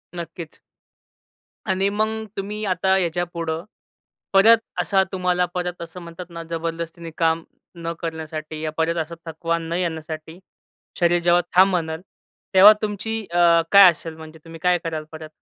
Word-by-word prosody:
नक्कीच. 170 -1 -8 1.1
आणि 190 +1 +2
मग 220 +2 -1
तुम्ही 210 +2 -4
आता 190 0 +2
याच्यापुढं 170 -2 -2 0.7
परत 220 +4 +7 0.2
असा 195 -2 +2
तुम्हाला 180 -1 +1
परत 180 -1 -3
असं 170 +2 -8
म्हणतात 170 +1 -9
ना 170 -1 -7
जबरदस्तीने 165 0 -4
काम 165 0 +1 0.4
न 165 0 -2
करण्यासाठी 155 -2 -6
या 155 - -2
परत 165 +1 +1
असा 170 +2 -10
थकवा 165 +1 -2
न 165 0 -5
येण्यासाठी 160 -1 -4 0.6
शरीर 175 0 +3
जेव्हा 175 0 +4
थांब 190 +2 +7
म्हणल 160 -2 -2 0.5
तेव्हा 200 +3 +9
तुमची 215 +1 -3
अ, 170 -1 +5
काय 200 -2 +10
असेल 165 0 -8
म्हणजे 160 0 -12
तुम्ही 165 0 -10
काय 180 0 +4
कराल 160 -2 -3
परत? 155 -1 -9
170 Hz, 145 wpm, -22 LUFS, 165-185 Hz, 1.1 s, काय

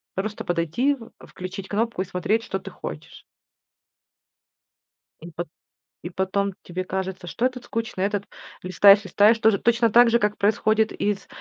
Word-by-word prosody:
просто 210 +2 -3
подойти, 175 - 0
в 235 -3 -14 0.2
включить 185 +1 -8
кнопку 225 -1 -1
и - - -2
смотреть, 195 +4 -1
что 190 - -4
ты 195 - -10
хочешь. 75 - -9 2.0
И 170 - -10
по 170 +1 -5 0.6
И 175 - -6
потом 190 +2 -1
тебе 180 +1 -4
кажется, 190 -1 -4
что 175 +9 -1
этот 250 -1 -3
скучный, 225 -4 -3
этот 205 0 -2 0.4
листаешь, 200 +3 +6
листаешь, 205 +4 +4
тоже, 220 -2 +4
точно 235 0 +2
так 240 +2 +7
же, 235 - +4
как 210 -1 0
происходит 215 +1 +2
из 205 -1 -2
200 Hz, 155 wpm, -24 LUFS, 185-225 Hz, 2.0 s, так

